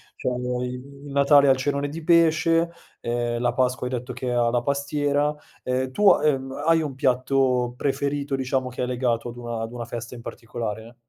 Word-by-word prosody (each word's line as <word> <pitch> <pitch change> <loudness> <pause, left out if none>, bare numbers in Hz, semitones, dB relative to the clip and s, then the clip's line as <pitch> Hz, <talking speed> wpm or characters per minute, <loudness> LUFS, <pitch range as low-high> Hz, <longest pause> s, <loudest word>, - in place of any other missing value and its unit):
cioè, - - -6
ehm, 125 0 -1
il 140 +3 -7
Natale 140 0 +5
ha - - +8
il 130 - +3
cenone 140 +1 -1
di 160 +3 -7
pesce, 165 0 +4 0.3
ehm, 120 0 -1
la 120 0 +1
Pasqua 125 0 0
hai 125 - -3
detto 125 0 -4
che 125 0 -3
ha 120 -1 +3
la 120 0 0
pastiera. 145 +1 0 0.3
Ehm, 130 +1 -1
tu, 205 +8 +5
ha - - +4
ehm, 135 -3 +1
hai 165 0 +4
un 145 -4 -4
piatto 130 -1 +1
preferito, 140 +1 -1
diciamo 130 -1 -1
che 125 - -6
è 125 - 0
legato 120 -2 -1
ad 120 - -10
una 120 -1 -4
ad 115 0 -4
una 120 -1 -5
festa 120 +1 -6
in 120 - -9
particolare? 115 -1 -6
130 Hz, 200 wpm, -24 LUFS, 120-140 Hz, 0.3 s, ha